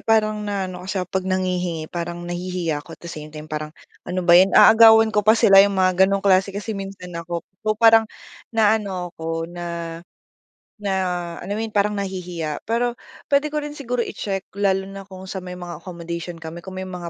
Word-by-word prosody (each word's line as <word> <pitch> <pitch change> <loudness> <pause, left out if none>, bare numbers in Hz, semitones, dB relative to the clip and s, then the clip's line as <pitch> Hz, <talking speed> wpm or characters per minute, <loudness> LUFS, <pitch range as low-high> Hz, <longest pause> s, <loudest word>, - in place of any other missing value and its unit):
parang 215 -1 +2
naano 190 -3 -3
kasi 195 - -3
ako, 180 - -1
eh, - - -57
'pag 190 -1 0
nanghihingi 180 -3 -1
parang 175 0 -4
nahihiya 175 -3 -3
ako - - -12
at - - -33
the 170 - -6
same 155 -2 -8
time 155 0 -9
parang, 155 0 -3 0.4
"ano 180 0 -2
ba 170 - +6
'yan 185 +2 +7
aagawan 225 0 +8
ko 210 - +4
pa 220 +2 +5
sila?" 195 -2 +8
'yong 200 -1 +1
mga 185 0 +4
gano'ng 195 0 -1
klase 190 0 +4
kasi 210 +2 -4
minsan 195 -2 -7
ako. 170 0 -5 0.2
So 215 0 0
parang, 225 -1 +6 0.5
naano 205 -5 +1
ako 165 0 -3
na, 170 -1 -6 0.8
na 205 -2 -3 0.5
alam 200 +4 -4
mo 220 - -2
'yun 220 - -9
parang 205 0 +1
nahihiya 180 -5 -4
pero 240 +1 +1 0.3
puwede 285 +2 +2
ko 300 - -3
rin 295 - -6
siguro 250 -4 -4
i-check 195 -2 -4
lalo 195 -1 +1
na 195 0 -10
kung 190 0 -10
sa 190 0 -5
may 180 0 -8
mga 175 -1 -8
accommodation 170 -1 -6
kami 165 +1 -8
kung 190 +1 -9
may 190 - -4
mga 180 -2 -6
185 Hz, 200 wpm, -22 LUFS, 175-205 Hz, 0.8 s, aagawan